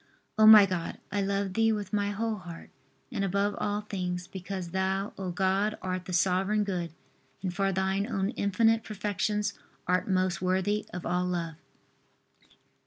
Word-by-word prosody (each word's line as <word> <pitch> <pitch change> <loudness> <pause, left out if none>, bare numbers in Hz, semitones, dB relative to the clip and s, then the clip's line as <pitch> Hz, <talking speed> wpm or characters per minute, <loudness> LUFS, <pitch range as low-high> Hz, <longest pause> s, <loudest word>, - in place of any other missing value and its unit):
O 215 0 +6
my 215 -2 +11
God, 185 -3 -3
I 200 +1 0
love 195 -1 -1
Thee 225 +2 +3
with 210 -1 -3
my 205 -1 +1
whole 220 +2 -2
heart, 175 -3 -10 0.4
and 200 - -2
above 200 +2 +1
all 205 0 -1
things 180 -3 -4
because 190 -1 -6
Thou, 190 +2 -1
O 190 -1 -4
God, 195 +4 +1
art 185 -1 -3
the - - -6
Sovereign 190 +4 +2
Good 175 -5 -3 0.5
and 185 -2 -2
for 195 +1 +1
Thine 190 +2 0
own 200 -3 -1
infinite 225 +1 +2
perfections 210 0 -1 0.3
art 180 +3 +1
most 185 -1 +1
worthy 190 +3 0
of 180 - -6
all 180 0 0
love. 170 -2 -2
195 Hz, 160 wpm, -29 LUFS, 185-205 Hz, 0.5 s, my